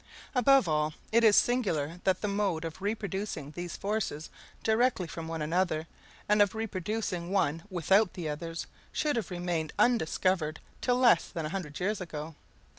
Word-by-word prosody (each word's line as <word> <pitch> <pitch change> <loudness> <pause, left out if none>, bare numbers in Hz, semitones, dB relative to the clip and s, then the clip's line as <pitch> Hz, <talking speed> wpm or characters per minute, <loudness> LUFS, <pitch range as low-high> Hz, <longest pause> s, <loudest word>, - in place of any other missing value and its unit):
Above 265 -3 +5
all, 155 0 +1 0.2
it 230 +1 +4
is 215 -2 +7
singular 175 - +1
that 185 -1 +2
the 210 - 0
mode 200 -5 0
of 165 +3 -7
reproducing 200 -7 -3
these 175 +2 -6
forces 195 -7 -2 0.3
directly 225 -3 +2
from 165 0 -6
one 165 -1 -3
another, 165 0 0 0.4
and 210 0 +4
of 205 +1 +3
reproducing 205 -4 -3
one 165 -5 +1
without 190 +3 +3
the 175 -3 -4
others, 165 +2 -4 0.3
should 300 -1 0
have 230 - -2
remained 175 -3 -2
undiscovered 185 -7 +2 0.2
till 245 - +2
less 240 -9 +5
than 165 -2 -4
a - - -3
hundred 160 -5 -5
years 200 +2 -1
ago. 160 -2 -6
185 Hz, 160 wpm, -30 LUFS, 160-210 Hz, 0.4 s, is